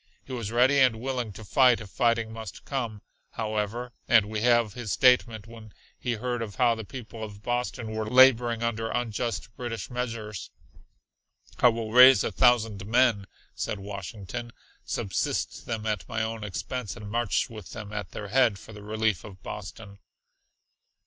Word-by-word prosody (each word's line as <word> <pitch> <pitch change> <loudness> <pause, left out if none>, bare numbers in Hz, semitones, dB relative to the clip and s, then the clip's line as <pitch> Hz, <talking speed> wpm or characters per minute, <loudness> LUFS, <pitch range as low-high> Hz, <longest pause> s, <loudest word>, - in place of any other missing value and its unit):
He 130 - -8
was 115 -4 -4
ready 130 +4 +4
and 130 -4 +5
willing 125 -3 -3
to 110 - -10
fight 125 +2 +4
if 105 -4 -10
fighting 115 -2 +1
must 110 -4 -8
come, 115 -7 -4 0.3
however, 110 +2 -3
and 115 -3 +5
we 110 +1 -4
have 120 -2 +3
his 120 -4 -5
statement 120 -4 +3
when 115 -2 -13 0.3
he 125 - -1
heard 120 +1 -3
of 105 -3 -5
how 120 -2 +4
the 110 -1 -6
people 115 -1 -8
of 105 -1 -9
Boston 120 -2 -2
were 110 0 -3
laboring 120 -2 +5
under 115 -1 -1
unjust 115 -1 -3
British 120 -2 -5
measures, 115 -5 -4 1.1
"I - - +7
will 115 -2 0
raise 125 -1 +8
a - - -1
thousand 115 -5 +3
men," 115 -4 +3 0.3
said - - -3
Washington, 100 +4 -7 0.3
"subsist 95 - -2
them 110 -2 -3
at 105 -3 -2
my 110 0 -1
own 110 -1 -4
expense 115 +3 -4
and 105 -3 -8
march 115 +1 0
with 110 -5 -10
them, 105 -1 -8
at 105 -1 -4
their 105 - -7
head, 120 -3 +3
for 110 - -13
the 105 - -10
relief 110 -1 -1
of 95 -2 -12
Boston." 100 0 -8
115 Hz, 165 wpm, -27 LUFS, 105-120 Hz, 1.1 s, raise